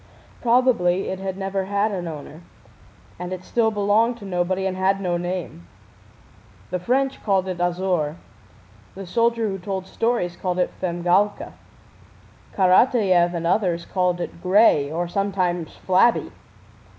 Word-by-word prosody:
Probably 230 -7 +2
it 190 - -4
had 190 -1 -4
never 195 0 -2
had 200 +2 0
an 180 -3 -4
owner, 155 0 -8 0.8
and 180 0 -5
it 185 -1 -5
still 230 +2 +1
belonged 215 +3 +1
to 210 - -11
nobody 185 0 -1
and 190 -1 -1
had 190 +1 +1
no 180 -3 -1
name. 175 - -5 1.0
The 180 - -1
French 265 +8 0
called 190 -3 +1
it 180 -2 -4
Azor; 175 -4 0 0.8
the 195 0 -7
soldier 230 +4 +1
who 195 -1 -4
told 190 0 -4
stories 225 -5 -1
called 180 0 -3
it 180 - 0
Femgálka; 180 +3 0 1.0
Karatáev 185 -2 +4
and 170 0 -3
others 175 -2 +1
called 180 -2 0
it 170 -1 -6
Gray, 180 -7 +4
or 170 +2 -2
sometimes 180 -3 -1
Flabby. 190 +6 +2
185 Hz, 140 wpm, -22 LUFS, 175-205 Hz, 1.0 s, Karatáev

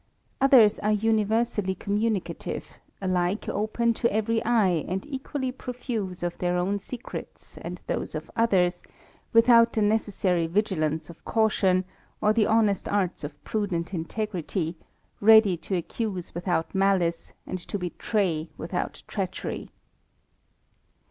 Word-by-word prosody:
Others 250 -6 +6
are 210 - +1
universally 215 -2 +1
communicative, 210 +1 -2 0.4
alike 185 +2 0
open 225 +3 0
to 235 +1 0
every 220 +2 0
eye, 200 -9 +2
and 190 +1 -3
equally 270 -1 -3
profuse 240 -8 -5
of 175 0 -2
their 180 0 +1
own 195 +3 0
secrets 240 +4 -8
and - - -6
those - - -3
of - - -6
others, 190 -6 +2 0.5
without 230 0 +6
the 215 - +2
necessary 200 -5 +1
vigilance 160 -5 0
of 170 - -18
caution, 195 -4 +2 0.3
or 210 0 +3
the 215 -1 +3
honest 215 -3 +2
arts 190 -5 0
of 145 0 -8
prudent 190 -6 -2
int^rity, 180 -1 -3 0.5
ready 220 -3 +7
to 190 - -3
accuse 185 +1 -3
without 175 -1 -1
malice, 190 -4 +1
and 185 - -4
to 190 - -5
betray 180 -2 -1
withoat - - -4
treachet^. - - -4
200 Hz, 120 wpm, -26 LUFS, 180-225 Hz, 0.5 s, ready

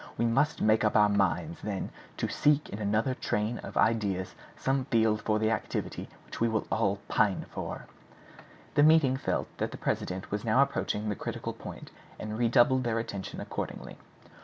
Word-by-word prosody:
We 115 - +1
must 135 +7 +2
make 110 +1 +4
up 105 - +2
our 105 -1 +6
minds, 100 - 0
then, 100 -3 -3 0.3
to - - -1
seek 150 0 +2
in 100 - -6
another 110 +5 +1
train 110 -1 -1
of - - -7
ideas 100 -5 +1 0.2
some 135 -1 0
field 110 -5 +2
for 105 0 +1
the 110 +1 +1
activity 110 - -3 0.2
which - - -9
we 115 - +3
all 110 -2 0
pine 100 -3 +1
for." - - -5 0.9
The - - +4
meeting 150 -3 +6
felt 130 - -1
that - - 0
the - - -8
president 95 +1 -3
was 105 0 -2
now 120 +4 +5
approaching 110 -6 -2
the 105 - -1
critical - - -4
point, - - -9 0.3
and 110 0 -5
redoubled 120 +3 +4
their 115 -2 0
attention 100 -4 -4
accordingly. - - -6
110 Hz, 170 wpm, -29 LUFS, 105-130 Hz, 0.9 s, our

